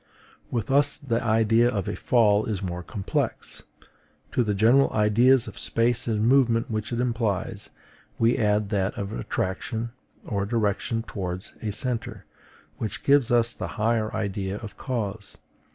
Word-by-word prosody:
With 120 0 -2
us 145 +1 +3
the 115 -5 -2
idea 115 +1 +3
of 100 -6 -2
a - - -2
fall 110 -3 +3
is 105 -3 -2
more 90 -1 -3
complex: 95 +2 -3 0.7
to 125 - +2
the 105 -2 -1
general 120 +7 +5
ideas 115 +4 +4
of - - -9
space 120 +1 0
and 110 -1 +1
movement 120 -2 +3
which 110 +1 -3
it 120 - -2
implies, 115 -6 -2 0.5
we 115 +1 +3
add 105 -1 +1
that 100 -2 -1
of 100 0 -4
attraction 110 - -3 0.3
or 100 -2 -2
direction 115 0 0
towards 95 -4 -5
a 110 - -2
centre, 115 -2 -3 0.5
which 110 -4 -4
gives 140 -3 +4
us 120 -1 +3
the - - -5
higher 110 0 +1
idea 100 -1 -2
of 110 -1 -9
cause. 110 -5 -4
110 Hz, 150 wpm, -25 LUFS, 100-120 Hz, 0.7 s, general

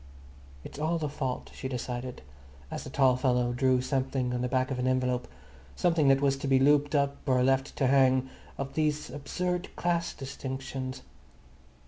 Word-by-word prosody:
It's - - -9
all 160 +3 +1
the 155 -2 -2
fault, 135 -3 -4
she 130 - -5
decided, 125 - -5 0.5
as - - -4
the - - -7
tall 130 -2 +3
fellow 125 -2 +1
drew 130 0 +2
something 130 -1 -1
on 125 - -1
the 125 - 0
back 130 +2 0
of 130 - -2
an 125 - 0
envelope, 125 -1 0 0.5
something 165 -5 +2
that 135 0 +5
was 135 -1 +2
to 140 - -4
be 135 -1 +4
looped 145 +2 +4
up 140 -1 +1
or 130 -1 +3
left 135 +1 +1
to 135 - +1
hang, 130 -1 +4 0.3
of 135 0 -4
these 150 -1 0
absurd 180 +5 -3
class 170 -1 -1
distinctions. 130 -1 -5
135 Hz, 170 wpm, -29 LUFS, 130-145 Hz, 0.5 s, that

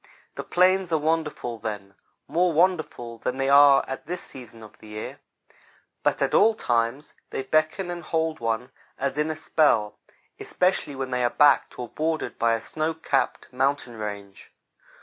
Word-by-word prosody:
The - - -6
plains 185 0 +2
are 160 - +3
wonderful 150 -6 -2
then 105 -3 -6 0.3
more 175 +1 +2
wonderful 155 -9 0
than 125 - -3
they 135 0 0
are 140 0 +7
at 135 +2 -6
this 180 +1 -4
season 115 -3 -11
of 110 - -15
the 110 - -14
year; 105 0 -7 0.8
but - - +1
at - - -1
all 220 +2 +5
times 120 - -1 0.2
they 135 - -4
beckon 155 +6 0
and 175 0 -5
hold 160 -1 -1
one 115 +2 -2 0.3
as 140 +1 -2
in 150 +1 +1
a 155 - -2
spell, 150 -9 +1 0.4
especially 180 -6 0
when 135 -1 -4
they 125 0 0
are 120 - +3
backed 145 +2 +3
or 125 - -5
bordered 160 +5 -3
by 115 0 +3
a 115 - -5
snow 155 +1 -2
capped 140 -4 -1
mountain 135 -2 0
range. 100 -2 -7
140 Hz, 170 wpm, -25 LUFS, 115-160 Hz, 0.8 s, are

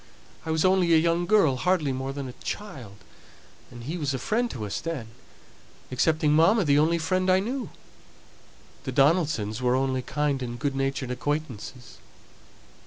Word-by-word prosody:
I - - -3
was 160 +1 +1
only 185 -3 +4
a - - +7
young 170 +2 +1
girl, 170 -10 +4
hardly 170 -2 +1
more 130 +1 -3
than 140 -1 -5
a 125 - -8
child, 135 - -6 0.7
and 120 -1 -11
he 160 +8 -4
was 140 -3 -1
a - - -1
friend 235 - 0
to 110 - -5
us 100 - -4
then 150 -9 -5 0.8
excepting 155 +3 +2
mamma, 190 +8 +5
the 145 -1 +4
only 165 +3 +3
friend 185 +3 0
I 185 0 +5
knew; 250 +6 -3 1.1
the - - -4
Donaldsons 140 - +2
were 125 0 +2
only 130 0 0
kind 145 0 -1
and 120 -1 -4
good 140 +1 -2
natured 135 -1 -2
acquaintances." 125 -3 -4
150 Hz, 165 wpm, -26 LUFS, 130-170 Hz, 1.1 s, a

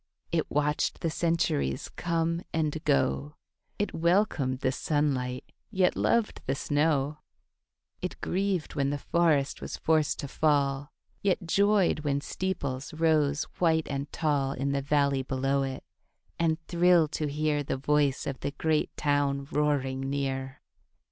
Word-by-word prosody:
It 165 -2 0
watched 150 0 0
the 165 - 0
centuries 155 - 0
come 170 0 0
and 155 -1 -1
go, 70 +1 +1 0.4
It 205 - -1
welcomed 165 -7 +1
the 130 - +2
sunlight 135 -4 -1 0.2
yet 190 -3 +2
loved 235 -2 +1
the 135 - +1
snow, 145 0 +1 0.8
It - - -4
grieved 190 -3 -1
when 140 -1 0
the 145 - -1
forest 155 -2 +1
was - - -5
forced 155 -2 +2
to 140 - -5
fall, 140 -1 +1 0.3
Yet 190 -3 +1
joyed 200 0 +3
when 145 -2 0
steeples 140 -5 -3
rose 155 -2 +2 0.2
white 160 -2 +3
and 140 +1 -3
tall 145 -4 0
In 140 +1 -2
the 140 0 0
valley 140 -1 +2
below 135 +1 0
it, 135 -1 -4 0.6
and 160 -1 +2
thrilled 170 -3 +4
to 150 - -1
hear 150 0 0
The 140 - -2
voice 145 0 +1
of 135 -2 -4
the - - -2
great 155 +1 0
town 140 -1 +1
roaring 135 -2 0
near. 135 0 -3
145 Hz, 140 wpm, -28 LUFS, 135-165 Hz, 0.8 s, thrilled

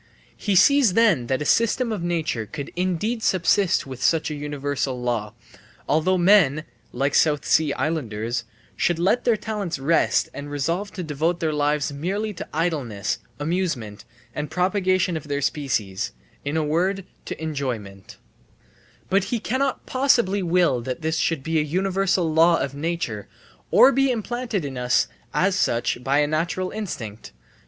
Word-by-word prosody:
He 200 -3 -1
sees 255 +2 +5
then 195 - +3
that 130 +3 0
a - - -8
system 230 - +2
of 210 -5 -3
nature 160 -10 -2
could 145 +1 -7
indeed 185 +6 -1
subsist 185 -1 +2
with 130 -2 -8
such 160 -1 +2
a - - -3
universal 145 -3 -3
law 115 -3 -2 0.5
although 165 +5 +2
men 175 -6 +4 0.3
(like 140 +3 -1
the - - +5
South 150 -3 +2
Sea 155 -2 +3
islanders) 120 -6 -2 0.3
should 175 - +1
let 195 +8 +1
their 235 -3 +3
talents 210 -6 -3
rest 150 +5 +2
and 145 0 -7
resolve 165 +8 -2
to 180 - -5
devote 160 +3 -1
their 160 -3 0
lives 150 0 0
merely 200 +9 -2
to 170 - -8
idleness, 140 -11 -2 0.2
amusement, 145 - -2 0.3
and 150 0 -4
propagation 185 +1 +1
of 155 -2 -5
their 140 -1 -1
species 110 - -2 0.3
in 145 +3 -2
a 160 - +1
word, 180 +6 0 0.2
to - - -6
enjoyment; 125 -11 -5 0.9
but 195 0 +2
he 240 - -2
cannot 260 +4 -1
possibly 240 -7 +2
will 170 -8 +2
that 130 +6 -5
this 160 0 0
should 165 -5 0
be 160 +1 +1
a - - +3
universal 185 +1 0
law 165 +1 +5
of 135 0 -2
nature, 145 -9 -3 0.4
or 265 - +7
be 270 +1 +2
implanted 235 - -2
in 130 -3 -5
us 125 0 +2 0.2
as 190 +1 +2
such 120 -6 0
by 135 +2 +2
a 150 - +4
natural 170 +5 -1
instinct. 115 - -6
160 Hz, 160 wpm, -23 LUFS, 140-190 Hz, 0.9 s, or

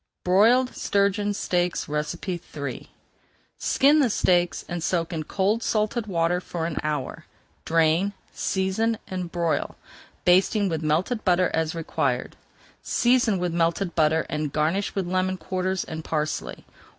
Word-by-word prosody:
BROILED 230 +8 +4
STURGEON 200 +1 +1
STEAKS 180 -2 -1
III 150 -2 -4 0.7
Skin 290 +3 +4
the 270 -5 +3
steaks 175 -4 +1
and 175 -1 -4
soak 170 -1 -1
in 160 - -2
cold, 200 +6 0
salted 215 +1 0
water 175 -1 +1
for 170 -2 -4
an 165 -2 -4
hour, 150 -3 -4 0.4
drain, 165 +4 +2 0.2
season, 195 +4 0
and 180 -2 -4
broil, 170 -2 -1 0.5
basting 195 +3 +4
with 160 -2 -2
melted 165 +10 0
butter 180 -1 +3
as 160 0 0
required. 165 -1 -2 0.5
Season 240 -4 +2
with 175 -1 -2
melted 170 +2 0
butter 160 0 +2
and 150 -1 -3
garnish 160 +7 0
with 195 -2 -1
lemon 185 +1 0
quarters 185 0 -2
and 160 0 -7
parsley. 155 -1 -3
180 Hz, 130 wpm, -25 LUFS, 165-200 Hz, 0.7 s, BROILED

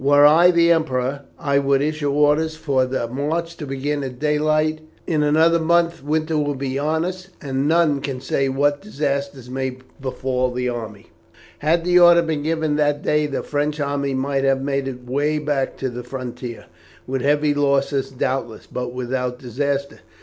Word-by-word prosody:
Were 145 +1 +6
I 165 +4 +7
the 170 -1 +4
Emperor 140 -4 0
I 140 -1 +1
would 140 -1 +2
issue 150 0 -1
orders 150 +2 +2
for 140 -5 0
the 125 -2 -2
march 155 +7 -2
to 150 - -6
begin 140 +2 -2
at 130 -2 -6
daylight. 155 +2 +1 0.3
In 155 -3 0
another 160 +3 +4
month 170 -1 +1
winter 155 +1 0
will 145 -1 -1
be 135 0 -3
on 160 +3 0
us, 185 0 -5
and 135 0 -2
none 160 -3 +3
can 135 -2 -4
say 135 +1 0
what 145 +2 +1
disasters 140 - -3
may 130 0 -3 0.2
befall 130 -1 -1
the 125 0 -2
army." 110 -4 -7 0.5
Had 165 +3 +1
the 180 0 +5
order 175 -1 +7
been 160 -3 -2
given 155 -1 0
that 145 -1 +1
day 150 0 +2
the 140 - -3
French 150 +1 -2
army 140 -1 -1
might 135 +1 -1
have 135 -1 +2
made 140 -1 -1
its 125 -2 -7
way 145 +4 0
back 145 -3 -1
to 135 - -2
the 125 0 -6
frontier, 125 -2 -7 0.4
with 130 0 -2
heavy 145 +2 +2
loss 140 -1 +1 0.2
doubtless, 130 -3 -3
but 125 -1 -5
without 125 0 -2
disaster. 140 +3 -3
145 Hz, 175 wpm, -21 LUFS, 130-155 Hz, 0.5 s, I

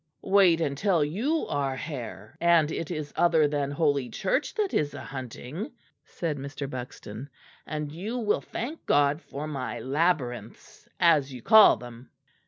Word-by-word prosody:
"Wait 190 -4 +5
until 160 +3 +1
you 245 - -1
are 140 -2 -1
hare, 120 - -7
and 170 -3 +4
it 165 - -4
is 155 -4 -5
other 165 -3 +4
than 145 -1 -1
Holy 145 -4 +1
Church 255 - -1
that 420 -3 -1
is 145 -1 0
a - - -7
hunting," 135 - -6 0.3
said 155 -5 -4
Mr. 140 +1 -5
Buxton, 125 -1 -7 0.4
"and 150 0 -4
you 200 +10 -4
will 215 -4 +1
thank 285 +8 -6
God 145 +2 +3
for 145 -2 -6
my 140 -4 -4
labyrinths, 140 -3 -2
as 150 -5 +4
you 125 -3 -9
call 220 - +8
them." 120 +1 -11
150 Hz, 150 wpm, -27 LUFS, 135-175 Hz, 0.4 s, call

